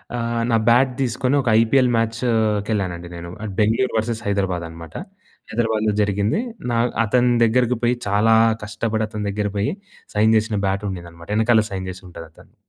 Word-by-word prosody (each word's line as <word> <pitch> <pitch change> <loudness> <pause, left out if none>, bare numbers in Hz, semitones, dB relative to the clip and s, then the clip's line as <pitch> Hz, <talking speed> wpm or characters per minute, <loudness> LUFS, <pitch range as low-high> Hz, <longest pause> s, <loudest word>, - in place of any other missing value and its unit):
ఆహ్, 115 0 -1
నా 115 - +3
బ్యాట్ 125 +3 +5
దీసుకొని 130 +1 0
ఒక 125 - -7
ఐపీఎల్ 125 +3 +3
మ్యాచ్‌కెళ్ళానండి 110 -6 0
నేను. 85 0 -8 0.3
బెంగుళూరు 115 +4 +2
వర్సస్ 110 +1 -2
హైదరాబాద్ 95 -4 -1
అనమాట. 80 -1 -11 0.6
హైదరాబాద్‌లో 110 -2 0
జరిగింది. 105 - 0 0.3
నా 115 - +1 0.3
అతని 125 +3 +2
దగ్గరకి 125 +1 +2
పోయి 120 +1 +3
చాలా 105 +3 +3 0.3
కష్టపడి 110 +1 -2
అతని 105 -1 -5
దగ్గరకి 105 0 -2
పోయి 105 - 0 0.4
సైన్ 110 +2 +4
జెసిన 110 0 -1
బ్యాట్ 100 +2 -1
ఉండేదన్నమాట. 85 -2 -9
ఎనకాల 110 0 +4
సైన్ 95 -1 -4
చేసి 95 +2 -12
ఉంటాది 85 -1 -10
అతను. - - -20
110 Hz, 150 wpm, -21 LUFS, 100-115 Hz, 0.6 s, బ్యాట్